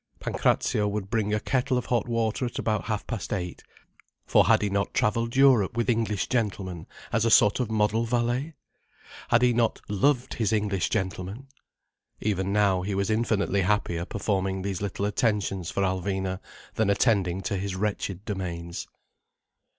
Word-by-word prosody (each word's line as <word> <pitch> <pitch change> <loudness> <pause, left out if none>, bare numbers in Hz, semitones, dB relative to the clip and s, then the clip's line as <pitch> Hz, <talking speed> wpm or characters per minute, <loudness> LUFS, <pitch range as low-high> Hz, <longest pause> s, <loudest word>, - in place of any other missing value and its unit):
Pancrazio 105 -1 +1
would 100 -1 -3
bring 110 -3 0
a 105 - +1
kettle 130 +2 0
of 125 - -2
hot 120 -2 0
water 115 +1 0
at 120 - -7
about 110 -2 -1
half 105 -3 -2
past 115 -6 -5
eight. 90 -4 -3 0.6
For - - +4
had - - +4
he 105 - +1
not 100 0 -1
travelled 115 +2 +1
Europe 130 -7 +4
with 120 +1 +2
English 110 -4 -1
gentlemen, 95 -8 -2 0.3
as 115 0 +2
a 115 - +3
sort 105 0 +5
of 125 -3 -1
model 110 +1 +1
valet! 120 +6 -1 0.7
Had 120 +1 +3
he 125 -1 +4
not 115 -1 +1
loved 125 +6 +1
his 110 -3 0
English 105 -4 0
gentlemen? 95 +6 -3 0.7
Even 100 -2 -1
now, 100 -3 +3
he 100 +2 -2
was 100 +2 0
infinitely 110 -3 +1
happier 90 -3 0
performing 95 0 -2
these 95 -2 -3
little 100 0 -2
attentions 105 -4 0
for 100 - -1
Alvina 95 0 -1 0.3
than 110 -2 +1
attending 100 -4 +2
to 100 +2 -2
his 95 0 -3
wretched 100 -1 -3
domains. 85 -4 -4
105 Hz, 160 wpm, -26 LUFS, 95-115 Hz, 0.7 s, sort